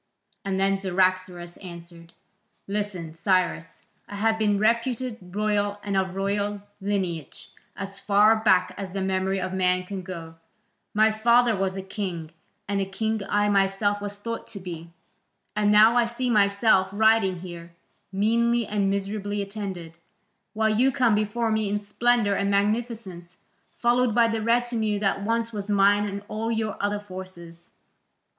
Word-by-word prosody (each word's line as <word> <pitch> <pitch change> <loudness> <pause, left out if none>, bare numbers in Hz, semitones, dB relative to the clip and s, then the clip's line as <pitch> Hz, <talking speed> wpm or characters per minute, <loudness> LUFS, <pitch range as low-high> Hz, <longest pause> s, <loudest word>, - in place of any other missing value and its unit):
And 195 -1 -2
then 195 0 +2
Cyaxares 185 -2 -1
answered: 170 -2 -11 0.5
"Listen, 200 -5 -3
Cyrus; 170 -1 -1 0.2
I 205 - -7
have 220 +2 +1
been 210 -2 +2
reputed 235 +2 0
royal 205 +2 -1
and 200 -1 -2
of 190 -1 0
royal 200 +1 -1 0.2
lineage 185 -7 -3 0.2
as 195 0 -7
far 210 +2 +4
back 210 -4 +3
as 190 -2 -6
the 195 - -2
memory 190 0 0
of 185 0 -3
man 185 -1 +1
can 190 +1 -6
go; 165 -3 -8 0.6
my 215 +1 +5
father 235 +1 +3
was 190 -1 -1
a 190 - -5
king 185 -5 -5 0.4
and 200 0 0
a - - 0
king 220 +2 -2
I 205 0 +2
myself 200 +1 +1
was 205 0 -6
thought 230 +2 -5
to 205 - -9
be; 170 -2 -8 0.7
and 210 -1 +2
now 215 +3 +6
I 240 -1 +4
see 240 +1 -2
myself 200 -2 +3
riding 205 -4 +3
here, 170 -2 -9 0.4
meanly 230 +4 +2
and 205 -2 0
miserably 200 +1 -2
attended, 195 -5 -6 0.6
while 220 0 +1
you 250 +5 +3
come 245 -3 +2
before 215 +2 0
me 220 -2 0
in 205 - 0
splendour 210 +1 +1
and 200 0 0
magnificence, 200 -4 -2 0.4
followed 240 -1 +2
by 235 -1 +5
the 225 -1 -1
retinue 230 -2 +1
that 200 -1 0
once 230 +2 -1
was 205 -1 -5
mine 205 0 +4
and 200 0 -5
all 225 +2 -3
your 220 -2 -1
other 205 0 -1
forces. 185 -4 -11
205 Hz, 150 wpm, -25 LUFS, 190-220 Hz, 0.7 s, now